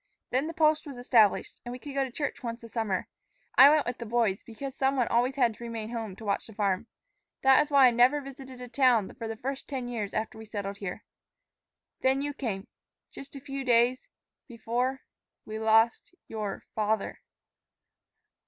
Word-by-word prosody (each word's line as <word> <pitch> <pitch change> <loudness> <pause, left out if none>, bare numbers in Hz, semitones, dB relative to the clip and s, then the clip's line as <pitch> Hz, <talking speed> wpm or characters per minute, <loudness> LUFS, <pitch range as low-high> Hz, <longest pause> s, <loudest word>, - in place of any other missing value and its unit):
Then 265 +4 +1
the 330 - -6
post 310 -1 +3
was 275 -3 -8
established, 230 -4 +3
and 240 - -6
we 250 - -5
could 280 +2 -9
go 275 0 +1
to 265 - -4
church 290 +3 -3
once 235 -1 -5
a 230 - -10
summer. 215 -5 -2 0.5
I 275 - +10
went 305 0 +3
with 245 +1 -4
the 235 - -5
boys, 220 -4 +1
because 260 +4 -7
some 270 +1 +1
one 250 -3 +1
always 245 +3 +2
had 245 -5 +3
to 235 - -12
remain 230 -1 -5
home 225 -5 -4
to 220 - -11
watch 200 -1 -1
the 220 - -13
farm. 205 +1 0 0.6
That 265 0 +7
is 295 - -11
why 280 -2 +6
I 250 - +6
never 245 +5 +4
visited 265 -2 -10
a 250 - -7
town 245 -5 +3
the 225 -1 -6
first 270 +1 -4
ten 260 -3 -4
years 220 -5 -4
after 220 0 -3
we 220 - -9
settled 200 -2 -5
here. 195 +1 -6 1.0
Then 265 +1 +2
you 290 0 -3
came, 215 -8 -4 0.4
just 275 +1 -11
a - - -6
few 275 0 -5
days 245 0 +3 0.4
before 245 +2 -2 0.4
we 215 0 -5
lost 225 +8 +3
your 210 -3 -5
father." 215 -1 -1
240 Hz, 190 wpm, -28 LUFS, 220-270 Hz, 1.0 s, I